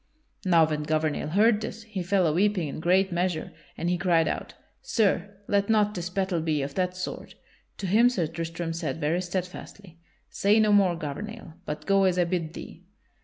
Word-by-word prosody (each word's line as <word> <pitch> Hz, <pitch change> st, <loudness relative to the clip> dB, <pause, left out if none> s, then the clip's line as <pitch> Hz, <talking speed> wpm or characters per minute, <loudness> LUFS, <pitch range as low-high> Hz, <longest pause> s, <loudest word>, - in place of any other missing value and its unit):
Now 170 Hz, -4 st, +5 dB
when 150 Hz, -1 st, -2 dB
Gouvernail 155 Hz, 0 st, -1 dB
heard 210 Hz, +6 st, +3 dB
this, 220 Hz, 0 st, -6 dB
he 215 Hz, -4 st, -5 dB
fell 185 Hz, +1 st, +2 dB
a 155 Hz, -, +2 dB
weeping 190 Hz, -1 st, +1 dB
in 140 Hz, -, -6 dB
great 185 Hz, +3 st, +2 dB
measure; 175 Hz, -1 st, -1 dB, 0.3 s
and 170 Hz, -, -2 dB
he 175 Hz, 0 st, 0 dB
cried 170 Hz, -3 st, +3 dB
out: -, -, -4 dB, 0.3 s
"Sir, 205 Hz, -2 st, 0 dB
let 200 Hz, 0 st, +1 dB
not 210 Hz, -1 st, +3 dB
this 175 Hz, -3 st, -4 dB
battle 185 Hz, -2 st, -1 dB
be 155 Hz, -3 st, 0 dB
of 140 Hz, 0 st, -5 dB
that 180 Hz, +1 st, -1 dB
sort!" 185 Hz, -, -6 dB, 0.4 s
To 200 Hz, -, -5 dB
him 220 Hz, +6 st, +5 dB
Sir 190 Hz, -9 st, -1 dB
Tristram 165 Hz, +1 st, -4 dB
said 165 Hz, 0 st, -3 dB
very 165 Hz, +4 st, 0 dB
steadfastly: 180 Hz, 0 st, -6 dB, 0.3 s
"Say 205 Hz, +2 st, +2 dB
no 215 Hz, -1 st, +4 dB
more, 195 Hz, -4 st, +4 dB
Gouvernail, 165 Hz, +5 st, -6 dB
but 150 Hz, -, -5 dB
go 195 Hz, -1 st, +3 dB
as 185 Hz, -1 st, +2 dB
I 180 Hz, -, +4 dB
bid 170 Hz, -2 st, -2 dB
thee." 175 Hz, -, -10 dB
180 Hz, 190 wpm, -26 LUFS, 165-200 Hz, 0.4 s, Now